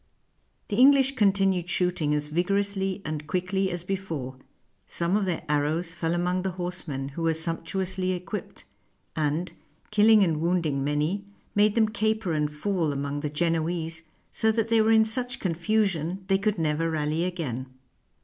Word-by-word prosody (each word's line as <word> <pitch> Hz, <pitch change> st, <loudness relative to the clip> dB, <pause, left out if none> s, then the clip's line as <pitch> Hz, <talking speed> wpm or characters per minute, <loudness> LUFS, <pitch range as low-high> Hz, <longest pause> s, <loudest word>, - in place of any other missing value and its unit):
The 205 Hz, -, -1 dB
English 275 Hz, +1 st, +6 dB
continued 195 Hz, -5 st, +2 dB
shooting 175 Hz, -4 st, 0 dB
as 150 Hz, 0 st, -1 dB
vigorously 195 Hz, +4 st, -1 dB
and 155 Hz, -1 st, -4 dB
quickly 190 Hz, +2 st, 0 dB
as 175 Hz, -1 st, -4 dB
before; 165 Hz, -9 st, -4 dB, 0.5 s
some 170 Hz, -, 0 dB
of 210 Hz, -1 st, +1 dB
their 180 Hz, -3 st, -2 dB
arrows 150 Hz, +3 st, 0 dB
fell 165 Hz, -1 st, -1 dB
among 180 Hz, +1 st, 0 dB
the 190 Hz, -1 st, -2 dB
horsemen, 175 Hz, -7 st, -4 dB
who 140 Hz, +4 st, -7 dB
were 165 Hz, -1 st, +2 dB
sumptuously 185 Hz, +3 st, -2 dB
equipped, 180 Hz, +2 st, -6 dB, 0.5 s
and, 160 Hz, +3 st, -1 dB, 0.4 s
killing 215 Hz, 0 st, +6 dB
and 160 Hz, -4 st, 0 dB
wounding 165 Hz, -5 st, +1 dB
many, 150 Hz, +8 st, -1 dB, 0.3 s
made 210 Hz, 0 st, +3 dB
them 225 Hz, -2 st, +4 dB
caper 220 Hz, -3 st, 0 dB
and 150 Hz, -1 st, +1 dB
fall 165 Hz, 0 st, -1 dB
among 140 Hz, +1 st, -3 dB
the 150 Hz, 0 st, -3 dB
Genoese 165 Hz, +1 st, -1 dB, 0.3 s
so 220 Hz, -, +2 dB
that 225 Hz, 0 st, 0 dB
they 230 Hz, -1 st, +4 dB
were 220 Hz, -, +3 dB
in 220 Hz, 0 st, +6 dB
such 245 Hz, +2 st, -1 dB
confusion 185 Hz, -1 st, 0 dB
they 195 Hz, 0 st, +3 dB
could 210 Hz, 0 st, 0 dB
never 160 Hz, 0 st, 0 dB
rally 155 Hz, +1 st, 0 dB
again. 150 Hz, -9 st, -3 dB
180 Hz, 155 wpm, -26 LUFS, 155-200 Hz, 0.5 s, English